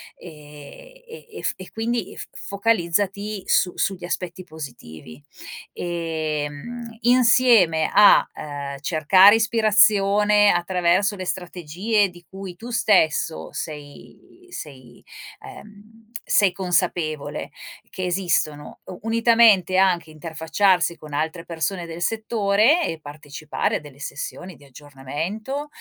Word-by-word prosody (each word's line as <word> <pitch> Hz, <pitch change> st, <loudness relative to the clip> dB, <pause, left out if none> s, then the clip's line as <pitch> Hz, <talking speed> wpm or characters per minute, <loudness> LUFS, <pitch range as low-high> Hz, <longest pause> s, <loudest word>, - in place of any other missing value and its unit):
e 155 Hz, -, -14 dB
e 465 Hz, 0 st, -13 dB
ef -, -, -1 dB
e 185 Hz, -, -11 dB
quindi 225 Hz, -2 st, -3 dB
f -, -, -7 dB
focalizzati 200 Hz, 0 st, -1 dB
su 180 Hz, -, +2 dB
sugli 185 Hz, -2 st, -2 dB
aspetti 180 Hz, 0 st, -5 dB
positivi, 100 Hz, -, -11 dB, 0.5 s
ehm, 165 Hz, +6 st, -5 dB
insieme 235 Hz, -9 st, +4 dB
a, 210 Hz, -, +7 dB
ehm, 140 Hz, -2 st, -7 dB
cercare 185 Hz, +7 st, +5 dB
ispirazione 210 Hz, -2 st, +4 dB
attraverso 180 Hz, +3 st, +1 dB
le 185 Hz, -, -6 dB
strategie 185 Hz, +4 st, -1 dB
di 175 Hz, -2 st, -16 dB
cui 190 Hz, -2 st, -9 dB
tu 230 Hz, +6 st, -10 dB
stesso 175 Hz, -8 st, +1 dB
sei 150 Hz, -, -10 dB
sei, 130 Hz, -, -11 dB, 0.4 s
ehm, 210 Hz, 0 st, -13 dB, 0.3 s
sei 195 Hz, -4 st, +3 dB
consapevole 175 Hz, -5 st, -2 dB, 0.4 s
che 185 Hz, -, -5 dB
esistono, 175 Hz, -5 st, -2 dB
u 180 Hz, -, -9 dB
unitamente 225 Hz, -5 st, +4 dB
anche 180 Hz, -4 st, +2 dB
interfacciarsi 165 Hz, +3 st, 0 dB
con 155 Hz, -2 st, -13 dB
altre 160 Hz, +4 st, -3 dB
persone 170 Hz, +2 st, -3 dB
del 165 Hz, +1 st, -8 dB
settore 220 Hz, -, +2 dB
e 165 Hz, -1 st, -5 dB
partecipare 145 Hz, 0 st, -4 dB
a -, -, -8 dB
delle 145 Hz, -2 st, -14 dB
sessioni 175 Hz, +5 st, -7 dB
di 145 Hz, -, -20 dB
aggiornamento, 150 Hz, -, -6 dB
180 Hz, 110 wpm, -22 LUFS, 155-210 Hz, 0.5 s, a